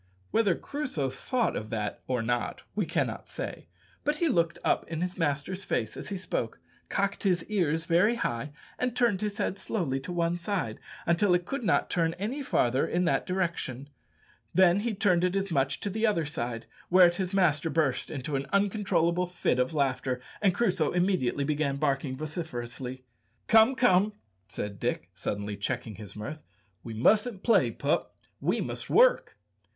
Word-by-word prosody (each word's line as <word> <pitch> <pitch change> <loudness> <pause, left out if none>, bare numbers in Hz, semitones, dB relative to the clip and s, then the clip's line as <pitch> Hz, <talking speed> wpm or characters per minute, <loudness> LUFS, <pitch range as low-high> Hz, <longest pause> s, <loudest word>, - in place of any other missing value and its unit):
Whether 200 -6 +3
Crusoe 255 - -3
thought 240 - -1
of 110 - -4
that 105 -2 -3
or 125 -3 0
not 120 +1 -1
we - - -1
cannot - - -2
say, - - -6 0.4
but 295 +1 +1
he 335 0 +2
looked 170 - +1
up - - +2
in 165 0 -4
his 180 0 -2
master's 165 +4 -1
face 110 -2 -1
as - - -6
he 200 - -3
spoke, - - -3 0.3
cocked 200 0 0
his 180 -4 +2
ears 165 -6 +1
very 180 +7 +4
high, 140 - -2 0.3
and 250 -1 -1
turned 235 -6 +2
his 210 -1 -2
head 200 -2 -1
slowly 150 -11 -1
to 140 +7 -7
one 170 0 0
side, 175 - -2 0.3
until 175 +2 +3
it 175 0 -1
could 270 +4 -3
not - - +2
turn 165 -1 +1
any 220 +10 -3
farther 130 - +2
in 180 +1 +1
that 170 - +1
direction; 170 -8 -2 0.7
then 185 0 +6
he 225 0 -1
turned 185 -3 +3
it 180 +1 +1
as 195 -1 -1
much 135 -3 +1
to 205 - -2
the 220 +3 +1
other 170 -7 +1
side; 120 -6 -4 0.2
whereat 175 -1 +6
his 185 -2 -2
master 165 -5 +2
burst 145 -5 0
into 140 0 -3
an 135 0 -2
uncontrollable 190 -4 +2
fit 175 -7 0
of 125 0 +1
laughter, 135 -3 0 0.2
and 195 -3 +3
Crusoe 190 -9 +1
immediately 175 -7 +1
began 145 -1 0
barking 140 -2 -1
vociferously. 130 -5 -5 0.4
"Come, 225 +4 +6
come," 210 -4 +4 0.3
said 100 +1 -5
Dick, - - -2
suddenly 105 0 -3
checking 105 +2 -3
his 105 -3 -10
mirth, 145 +9 -6 0.4
"we 115 -2 -6
mustn't 210 - +3
play, 230 - +4
pup, - - -1 0.2
we - - 0
must - - -5
work." - - +4
170 Hz, 170 wpm, -29 LUFS, 135-200 Hz, 0.7 s, then